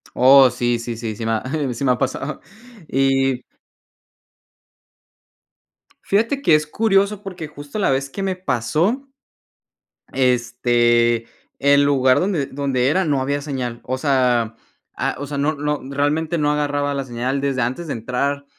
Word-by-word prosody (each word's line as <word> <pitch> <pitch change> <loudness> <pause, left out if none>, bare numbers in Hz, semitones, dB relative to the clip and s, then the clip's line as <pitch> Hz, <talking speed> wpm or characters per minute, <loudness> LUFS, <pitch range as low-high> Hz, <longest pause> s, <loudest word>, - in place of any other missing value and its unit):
Oh, 130 0 +7
sí, 120 -1 0
sí, 115 0 -5
sí, 110 -1 -5
sí 115 - -5
me 115 - 0
ha 110 - -1 0.3
sí 130 - -5
me 130 - +3
ha - - -3
pasado, 135 +2 -3 0.5
y 135 -1 +1 2.6
fíjate 230 +7 +1
que 165 - +3
es 150 0 +3
curioso, 200 +1 +1
porque, 180 -5 -7
justo, 145 +5 -8
la 195 - +2
vez 135 +1 0
que 195 +7 -5
me 190 -1 -1
pasó, 175 - -1 1.1
este, 120 -2 +2 0.3
el 140 +1 +4
lugar 130 -2 +3
donde 180 -7 0
donde 135 -2 -1
era 185 +7 +2
no 145 -5 0
había 140 +2 -1
señal, 125 -5 -4
o 130 +1 -3
sea, 125 -5 +1 0.4
ah, - - -1
o 145 - -5
sea, 145 0 -5
no 150 +2 0
no, 150 0 -2
realmente 150 +4 0
no 150 -1 +1
agarraba 145 -1 -1
la 140 - -2
señal, 130 +2 -3
desde 135 -3 -1
antes 130 +8 -3
de - - -2
entrar 140 +5 -2
140 Hz, 155 wpm, -20 LUFS, 125-150 Hz, 2.6 s, Oh